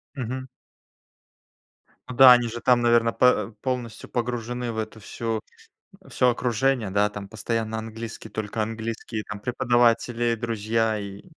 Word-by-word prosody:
Мгм. 130 0 -4 1.6
Ну 125 - -5
да, 130 +1 +10
они 120 -1 +2
же 120 +1 -6
там, 125 -1 +3
наверно, 120 -1 +3
пэ 125 -3 +3
полностью 125 -4 -4
погружены 120 0 -3
в 110 - -7
эту 110 0 -5
всю 115 +2 -3 0.7
всё 125 - +3
окружение, 120 -2 0
да? 105 +1 +2
Там 100 -1 -8
постоянно 110 +1 -3
английский, 115 0 -8
только 110 +1 -4
английские 110 0 -4
там 105 - -7
преподаватели, 120 0 +2
друзья 110 -1 -1
и 100 0 -8
115 Hz, 130 wpm, -25 LUFS, 110-120 Hz, 1.6 s, да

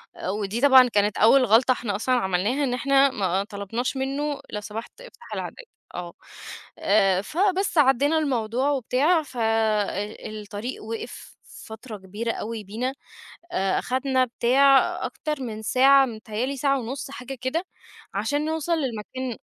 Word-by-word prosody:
أ - - -5
ودي 205 +3 -2
طبعًا 265 -2 +7
كانت 210 -3 +1
أول 255 +5 +6
غلطة 235 +4 +4
إحنا 235 -5 -1
أصلًا 255 +5 +1
عملناها 205 +5 0
إن 255 -3 0
إحنا 275 +2 +3
ما 190 -4 0
طلبناش 210 +6 -4
منّه 280 +2 -2
لو 210 - -4
سمحت 220 - -8
افتح - - -12
العدّاد، - - -6 0.3
آه. 175 -1 -6 0.7
آآ، 195 -2 +3
فبس 370 - 0
عدّينا 285 +2 +4
الموضوع 255 -3 0
وبتاع 285 +5 +2
ف 260 -3 -13
أ 220 -2 0
الطريق 215 +3 -6
وقف 225 +1 -7 0.3
فترة 220 0 -9
كبيرة 205 +4 -4
أوي 220 0 -5
بينا، 230 +7 -3 0.6
أ 190 0 +1
أخدنا 260 0 0
بتاع 265 +3 +4 0.3
أكتر 300 -3 -4
من 220 -3 -5
ساعة، 270 +4 +5
متهيّأ 220 -1 -4
لي 275 +1 -4
ساعة 275 +1 +1
ونُص 265 +3 -6
حاجة 270 0 -7
كده 260 +7 -1 0.5
عشان 290 +1 -1
نوصل 320 +1 -1
للمكان 255 -2 -4
245 Hz, 145 wpm, -24 LUFS, 215-275 Hz, 0.7 s, طبعًا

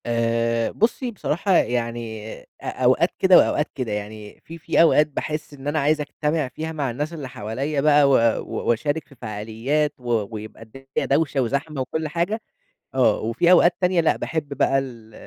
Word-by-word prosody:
آآ 115 0 0
بصّي، 240 +3 0
بصراحة 195 -2 -1
يعني 115 -4 -1
أ - - -21 0.2
أوقات - - +2
كده - - +7
وأوقات - - +2
كده، 120 -4 -3
يعني 105 0 -6
في 165 - -9
في 165 - +2
أوقات 155 -2 +5
باحس 150 +1 -5
إن 140 0 -9
أنا 150 +1 0
عايز 150 +2 +2
أجتمِع 150 0 -1
فيها 160 +5 -6
مع 145 -5 -2
الناس 150 +7 -4
اللي 150 -5 -6
حواليّا 130 +7 -3
بقى 145 -1 +5
و - - +3 0.3
و - - -4
وأشارك 145 +6 0
في 140 - -17
فعاليّات 115 +7 -2
و 120 -4 -1
ويبقى 110 +1 -9
الدنيا 135 +4 -5
دَوشة 140 -1 +1
وزحمة 140 +4 -2
وكل 155 +5 -3
حاجة، 175 +8 -2 0.5
آه، 125 -5 +3
وفي 115 +10 +1
أوقات 175 -1 +6
تانية 180 -1 +3
لأ، 160 - +2
باحب 160 -2 -3
بقى 135 - +3
ال 115 -5 -9
140 Hz, 175 wpm, -23 LUFS, 115-155 Hz, 0.5 s, كده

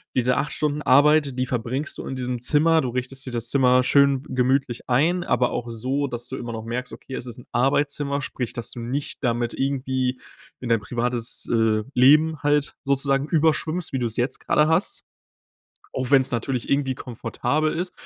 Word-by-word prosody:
diese 125 0 +2
8 145 +2 -1
Stunden 150 0 -1
Arbeit, 145 0 +4
die 130 - +1
verbringst 125 +4 -3
du - - -7
in 135 - -4
diesem 125 -1 -3
Zimmer. 160 +5 +3
Du 125 - -2
richtest 125 +2 -5
dir 130 - -6
das 115 0 -3
Zimmer 125 -2 +4
schön 140 0 +3
gemütlich 130 -1 0
ein. 165 +8 +2
Aber 125 - +1
auch 120 - -4
so, 130 +5 -2
dass 120 -1 -3
du 130 - -5
immer 120 -1 -6
noch 110 - -5
merkst: 125 +2 -4
„Okay, 130 - -9
es - - -5
ist 120 -1 -8
'n - - -14
Arbeitszimmer.“ 140 +1 0
Sprich, 125 -3 -4
dass 120 - -3
du - - -7
nicht 135 +5 -3
damit 120 -1 0
irgendwie 130 -2 -1 0.4
in 125 - -5
dein 115 -2 +2
privates, 120 +1 -1
äh, 110 -2 +2
Leben 150 +5 +5
halt 145 0 +1
sozusagen 140 +1 +1
überschwimmst, 160 0 0
wie 130 - 0
du 120 - -1
es 110 - -4
jetzt 125 +2 -1
gerade 150 0 +2
hast. 160 +5 0 0.9
Auch 130 -1 -3
wenn 135 -1 +7
es 130 - -2
natürlich 120 +1 -2
irgendwie 140 -2 +1
komfortabel 150 +6 -2
ist. 180 +2 -3
130 Hz, 195 wpm, -23 LUFS, 125-145 Hz, 0.9 s, wenn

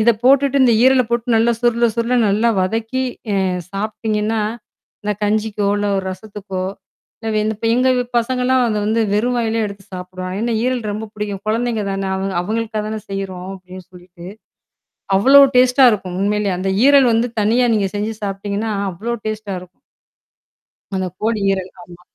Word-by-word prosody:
இத 235 +2 +5
போட்டுட்டு 275 +1 +4
இந்த 240 - +5
ஈரல 260 0 +5
போட்டு 235 0 0
நல்லா, 230 +1 +3
சுருள, 240 0 +3
சுருள 235 +2 0
நல்லா 215 +4 +2
வதக்கி 225 +7 -1 0.3
அ - - +1 0.4
சாப்பி்டீங்கன்னா 215 +1 -2 0.6
இந்த 210 - 0
கஞ்சிக்கோ, 210 -1 0
இல்ல 205 - -1
ஒரு 190 - -4
ரசத்துக்கோ 195 -1 -7 0.6
இல்ல 215 -1 0
இந்த 220 +1 -1
பே 225 - +1
எங்க 255 +1 +2 0.3
பசங்கலாம் 250 +2 +1
அத 220 -2 -1
வந்து 220 +2 +1
வெறும் 240 +4 +1
வாயிலயே 225 -1 0
எடுத்து 200 -1 -10
சாப்பிடுவாங்க. 185 +1 -6
ஏன்னா 235 0 0
ஈரல் 255 0 0
ரொம்ப 215 +2 -4
பிடிக்கும். 205 -2 -4
கொழந்தைங்க 225 0 0
தானே 195 0 -2
அவ 190 - -3 0.2
அவங்களுக்காக 220 +2 -2
தானே 215 0 -3
செய்யறோம் 190 -2 -5
அப்படின்னு 185 0 -11
சொல்லிட்டு. 180 -1 -14 0.9
அவ்ளோ 270 +8 +7 0.2
டேஸ்ட்டா 255 +1 +5
இருக்கும். 185 -4 -3
உண்மையிலயே 205 -1 0
அந்த 190 +1 -1 0.2
ஈரல் 280 -2 +6
வந்து 230 +2 +1
தனியா 235 +4 +3
நீங்க 205 -2 +1
செஞ்சு 210 +2 -2
சாப்பிடீங்கன்னா, 200 +2 -3 0.2
அவ்ளோ 215 +7 -5
டேஸ்ட்டா 215 -2 -4
இருக்கும். 180 0 -17 1.1
அந்த 185 -1 -1
கோழி 220 -1 0
ஈரல் 190 -1 -3
ஆமா. 175 0 -15
215 Hz, 155 wpm, -18 LUFS, 195-235 Hz, 1.1 s, அவ்ளோ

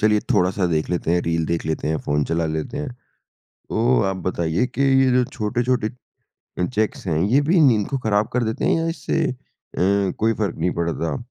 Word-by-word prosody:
चलिए 105 0 +3
थोड़ा-सा 90 +1 +2
देख 80 +1 0
लेते 85 -2 -1
हैं, 90 - +3
रील 80 -1 0
देख 85 +1 -1
लेते 80 -1 -2
हैं, 80 - +1
फ़ोन 75 0 0
चला 85 0 -1
लेते 80 - -3
हैं। 150 -1 -3 0.8
तो 120 +3 +2
आप 95 - -3
बताइए 85 +4 0
कि 135 - -4 0.2
ये 130 - +3
जो 125 0 +4
छोटे-छोटे 120 +1 -1 0.7
अ, 90 - +1
चेक्स 110 -3 -2
हैं 80 -3 0
ये 120 +9 +3
भी 175 +1 +4
नींद 115 -9 +4
को 135 - -1
खराब 105 -3 +1
कर 125 - +1
देते 110 0 -2
हैं - - +3
या 165 0 0
इससे 165 -1 -1
अ, - - -5 0.4
कोई 100 +3 +1
फ़र्क 100 -5 -1
नहीं 85 +3 +1
पड़ता? 85 -2 -1
105 Hz, 200 wpm, -22 LUFS, 85-125 Hz, 0.8 s, जो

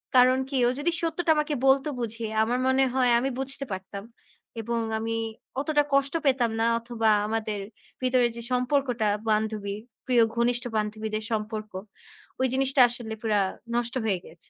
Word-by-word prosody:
কারণ 255 +1 +6
কি? 275 - -1
ও - - +4
যদি 330 +4 +1
সত্যটা 335 0 +1
আমাকে 300 0 0
বলতে 270 +2 +4
বুঝিয়ে, 230 -1 -3
আমার 245 +3 0
মনে 260 +1 +4
হয় 255 -2 +3
আমি 265 +3 0
বুঝতে 275 +1 -4
পারতাম 190 +1 -6 0.6
এবং 235 +1 -2 0.2
আমি 225 0 -2 0.4
অতটা 295 0 +2
কষ্ট 275 0 +2
পেতাম 255 -4 +3
না 230 - +3
অথবা, 230 -1 0 0.2
আমাদের 215 -2 -2 0.4
ভিতরে 255 -1 +3
যে 235 - -6
সম্পর্কটা 250 -2 +1 0.2
বান্ধবীর 215 -1 -1 0.3
প্রিয় 245 -2 +5
ঘনিষ্ঠ 240 +1 +1
বান্ধবীদের 215 0 -2
সম্পর্ক, 215 0 -3 0.7
ওই 260 - +3
জিনিসটা 270 0 +3
আসলে 235 -2 -6
পুরা 215 -2 +2 0.4
নষ্ট 240 0 -1
হয়ে 200 -4 +1
গিয়েছে। 160 - -14
240 Hz, 155 wpm, -26 LUFS, 220-265 Hz, 0.7 s, কারণ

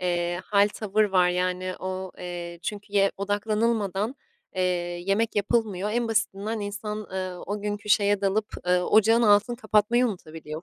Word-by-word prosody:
eee, 175 0 -1
hâl, 205 0 +4
tavır 215 0 0
var. 185 -3 +3
Yani, 180 +1 -1
o, 185 0 -4
eee, 175 -1 -6
"çünkü"ye 200 -1 0
odaklanılmadan, 210 +1 0 0.4
eee, 185 - 0 0.4
yemek 210 +3 +1
yapılmıyor. 205 -2 0
En 235 -1 0
basitinden 215 0 -1
insan, 210 +1 -5
eee, 185 -1 -3
o 205 +1 -3
günkü 205 0 -4
şeye 205 -1 +3
dalıp, 205 +2 +1 0.2
eee, 180 0 +4
ocağın 220 +5 +4
altını 215 +3 +4
kapatmayı 220 +2 +2
unutabiliyor, 160 -5 -7
205 Hz, 140 wpm, -26 LUFS, 185-215 Hz, 0.4 s, hâl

